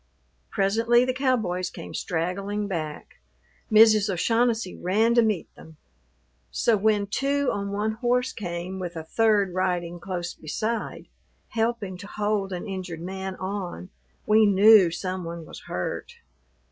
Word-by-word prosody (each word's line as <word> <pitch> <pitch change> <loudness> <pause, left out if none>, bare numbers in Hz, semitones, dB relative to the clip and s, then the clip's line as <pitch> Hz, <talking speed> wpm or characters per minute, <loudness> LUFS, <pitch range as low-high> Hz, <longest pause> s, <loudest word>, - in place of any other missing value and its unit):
Presently 230 +5 +3
the 255 - 0
cowboys 230 -9 0
came - - -9
straggling 195 +5 -2
back. 155 -6 -5 0.5
Mrs. 215 -1 +6
O'Shaughnessy 225 +2 +1
ran 215 +6 +2
to 235 - +5
meet 215 -6 -1
them. 160 -1 -15 0.7
So 225 - +2
when 210 0 +2
two 275 +6 0
on 200 0 -3
one 210 +2 -1
horse 250 +3 0
came 180 -1 -5
with 175 -2 -5
a 160 - -5
third 205 +1 +2
riding 175 -2 -1
close 175 -2 -4
beside, 215 +9 -4 0.4
helping 225 -4 -2
to 200 - -9
hold 205 -2 -1
an 180 +2 -4
injured 185 -4 -5
man 190 +1 -5
on, 185 -1 -5 0.3
we 215 0 +5
knew 200 -1 +7
some 185 +2 -4
one 170 -1 -6
was - - -10
hurt. 90 - -4
200 Hz, 135 wpm, -25 LUFS, 180-220 Hz, 0.7 s, knew